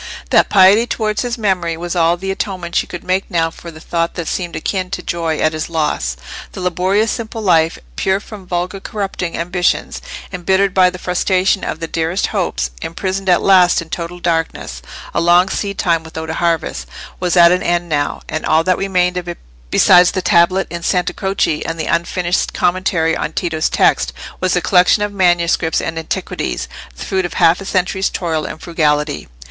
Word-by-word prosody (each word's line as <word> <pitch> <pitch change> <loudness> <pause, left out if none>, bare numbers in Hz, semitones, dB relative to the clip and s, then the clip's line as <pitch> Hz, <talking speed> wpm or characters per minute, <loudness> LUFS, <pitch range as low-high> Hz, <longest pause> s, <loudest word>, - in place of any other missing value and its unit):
That - - +4
piety 200 +4 +6
towards 215 -2 -1
his 245 0 -3
memory 180 -6 0
was 175 +1 -4
all 170 0 +3
the 195 +2 -3
atonement 185 -3 -4
she - - +1
could 175 - -7
make 185 +1 -1
now 165 -3 0
for 170 - -13
a 160 -2 -9
thought 170 +1 -2
that 170 -2 -4
seemed 175 -3 -3
akin 185 +2 -2
to 180 -1 -5
joy 165 -2 -2
at 155 - +1
his 155 +1 -4
loss. 150 - -1 0.4
The - - -7
laborious 185 +4 +1
simple 230 -1 -5
life, 165 -4 +3 0.2
pure 190 - +1
from 205 -3 -11
vulgar 180 +2 -2
corrupting 195 -4 -4
ambitions, 180 +1 -1 0.3
embittered 190 +2 +1
by 185 -1 +5
the 180 - -8
frustration 185 +2 +1
of - - -3
the 165 - -3
dearest 165 +4 -1
hopes, 60 0 -1
imprisoned 190 +3 -3
at 175 - +4
last 185 -2 +5
in 165 0 -8
total 175 +1 -5
darkness—a 165 - -3
long 175 +2 +4
seed 200 0 -3
time 165 -2 +1
without 160 0 -6
a - - -4
harvest—was 165 - -2
at 170 0 +8
an 180 - +2
end 175 0 0
now, 145 -3 -1
and 155 - -4
all 160 +1 +3
that 185 +1 +1
remained 180 -2 +1
of 180 -1 -4
it 175 - -5 0.3
besides 180 - +6
the 185 - -2
tablet 185 +1 +3
in 170 0 -5
Sante 180 +1 0
Croce 190 -6 0
and 165 0 -4
the 160 - -2
unfinished 175 +1 0
commentary 175 -3 +1
on - - -3
Tito's 165 -4 -1
text, - - +2 0.3
was 185 0 +1
the 180 - +1
collection 185 +3 +4
of 205 0 -3
manuscripts 175 -3 +2
and 165 0 -3
antiquities, 160 - -3 0.3
the - - -7
fruit 190 -1 0
of 175 - -5
half 165 +3 +4
a - - -7
century's 190 +1 0
toil 160 -4 -2
and - - -7
frugality. 150 -3 0
175 Hz, 185 wpm, -17 LUFS, 165-190 Hz, 0.4 s, at